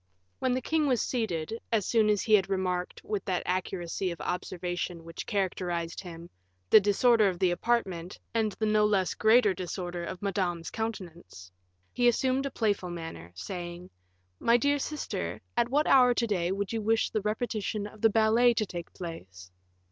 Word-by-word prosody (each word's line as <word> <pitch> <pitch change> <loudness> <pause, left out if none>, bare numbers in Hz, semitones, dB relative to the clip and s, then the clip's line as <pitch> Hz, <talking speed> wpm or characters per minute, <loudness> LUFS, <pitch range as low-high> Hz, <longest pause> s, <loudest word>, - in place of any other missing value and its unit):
When 255 - +1
the 255 - -2
king 310 +1 +1
was 250 -4 +2
seated, 220 -3 -2
as 215 -4 +2
soon 220 -2 +3
as 210 -2 +2
he 220 - +1
had 195 -3 +5
remarked, 185 -2 -2
with 210 -3 -3
that 185 -2 -1
accuracy 180 0 -2
of 170 - -6
observation 175 -1 -3
which 165 0 -8
characterized 175 -4 -2
him, 170 -2 -9 0.4
the - - +10
disorder 210 +1 +4
of 180 - -4
the 180 0 +2
apartment, 185 -4 -1 0.2
and 220 -2 +1
the 220 - -2
no 215 0 +3
less 200 -4 +2
great 225 +3 +5
disorder 175 -1 -4
of 180 +1 -6
Madame's 180 -4 -2
countenance, 175 - -6 0.4
he 245 - +3
assumed 260 +3 +2
a - - -3
playful 205 -7 -1
manner, 165 - -7
saying, 175 - -7 0.5
"My 235 +1 +4
dear 285 +3 +1
sister, 300 +2 -4 0.2
at 240 0 +2
what 295 +4 +2
hour 250 -2 +6
to 235 - +1
day 180 -5 0
would 200 +2 -2
you 225 - -1
wish 225 +1 +1
the 215 - 0
repetition 215 -1 -2
of 210 0 -11
the 225 - +6
ballet 225 +3 +4
to 215 - +1
take 175 -3 -7
place?" 95 - -9
200 Hz, 175 wpm, -29 LUFS, 175-225 Hz, 0.5 s, the